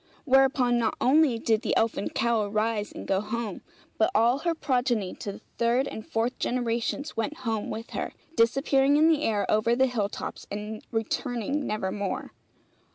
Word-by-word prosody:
Whereupon 265 Hz, -3 st, +4 dB
not 225 Hz, -2 st, 0 dB
only 275 Hz, -2 st, +4 dB
did 225 Hz, -1 st, +1 dB
the -, -, 0 dB
elfin 225 Hz, -2 st, 0 dB
cow 235 Hz, -1 st, +1 dB
arise 210 Hz, +1 st, -1 dB
and -, -, -8 dB
go 195 Hz, 0 st, +1 dB
home, 215 Hz, -1 st, -4 dB, 0.4 s
but 220 Hz, -, +4 dB
all 235 Hz, +5 st, +4 dB
her 340 Hz, +2 st, 0 dB
progeny 245 Hz, -9 st, 0 dB
to 200 Hz, -, -4 dB
the -, -, -12 dB, 0.2 s
third 240 Hz, +3 st, +2 dB
and 220 Hz, -, -6 dB
fourth 230 Hz, +4 st, -2 dB
generations 245 Hz, +4 st, -1 dB
went 285 Hz, +7 st, -2 dB
home 220 Hz, -2 st, -1 dB
with 225 Hz, +1 st, -6 dB
her, -, -, -3 dB, 0.2 s
disappearing 270 Hz, +4 st, +3 dB
in 315 Hz, +2 st, +5 dB
the 310 Hz, -2 st, +3 dB
air 210 Hz, -7 st, +1 dB
over 225 Hz, +2 st, +2 dB
the 260 Hz, +2 st, +4 dB
hill 225 Hz, -6 st, -1 dB
tops -, -, -7 dB
and 210 Hz, +1 st, -5 dB
returning 245 Hz, +4 st, -2 dB
nevermore. 200 Hz, -1 st, -3 dB
230 Hz, 165 wpm, -27 LUFS, 215-265 Hz, 0.4 s, in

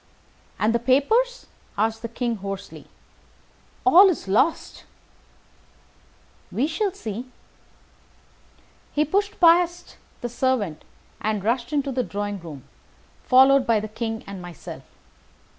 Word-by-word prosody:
"And 220 Hz, +2 st, +1 dB
the 235 Hz, -, +2 dB
papers?" 440 Hz, -, +2 dB, 0.3 s
asked 225 Hz, +2 st, 0 dB
the 230 Hz, -, -4 dB
King, 235 Hz, 0 st, -2 dB
hoarsely. 195 Hz, 0 st, -7 dB, 1.0 s
"All 380 Hz, +1 st, +8 dB
is 335 Hz, -, -3 dB
lost." 215 Hz, +12 st, 0 dB, 1.7 s
"We 255 Hz, -, 0 dB
shall 355 Hz, +6 st, -1 dB
see." 245 Hz, -, -7 dB, 1.6 s
He 300 Hz, +1 st, +2 dB
pushed 405 Hz, +7 st, -1 dB
past 345 Hz, 0 st, +3 dB, 0.2 s
the 240 Hz, -, -2 dB
servant 235 Hz, -, -1 dB, 0.4 s
and 215 Hz, -2 st, -1 dB
rushed 235 Hz, +3 st, -1 dB
into 285 Hz, -2 st, 0 dB
the 255 Hz, 0 st, 0 dB
drawing 205 Hz, -3 st, -4 dB
room, 155 Hz, -6 st, -10 dB, 0.6 s
followed 265 Hz, +1 st, +5 dB
by 230 Hz, -2 st, +3 dB
the 215 Hz, -, -5 dB
King 225 Hz, +1 st, -4 dB
and 195 Hz, -2 st, -8 dB
myself. 175 Hz, -2 st, -9 dB
240 Hz, 115 wpm, -23 LUFS, 210-310 Hz, 1.7 s, All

